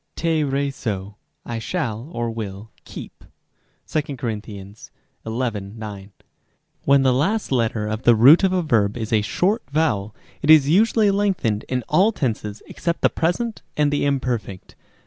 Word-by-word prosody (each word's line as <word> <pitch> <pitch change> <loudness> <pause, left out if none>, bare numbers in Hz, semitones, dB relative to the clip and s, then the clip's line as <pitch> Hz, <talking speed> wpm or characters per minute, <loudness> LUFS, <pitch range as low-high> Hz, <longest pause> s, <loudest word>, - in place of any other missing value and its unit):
τηρήσω, 140 - -1 0.3
I 115 -1 -4
shall, 120 -2 -3
or 120 -4 -2
will, 105 -1 -7
keep. - - -10 0.6
(2 145 -3 -2
Cor. 120 -2 -2
xi. 100 -2 -10 0.5
9.) 115 +1 -2
Rem. 100 -1 -7
d. 105 -3 -8 0.8
When 140 0 +5
the 130 -1 +4
last 195 - 0
letter 115 -4 0
of 110 +1 -3
the 120 -2 +5
root 135 - +7
of 190 - +3
a 185 -1 +1
verb 110 -7 +1
is 115 -1 -4
a 110 - +4
short 190 - 0
vowel, 110 -9 0 0.3
it 150 - -2
is 155 -3 +7
usually 210 +5 +4
lengthened 190 - 0
in 125 -1 -1
all 200 +5 +4
tenses 110 - -3
except 170 -1 -3
the - - +4
present 215 +8 -1 0.2
and 150 -1 +2
the 145 - 0
imperfect. 125 -9 -2
125 Hz, 155 wpm, -22 LUFS, 110-160 Hz, 0.8 s, root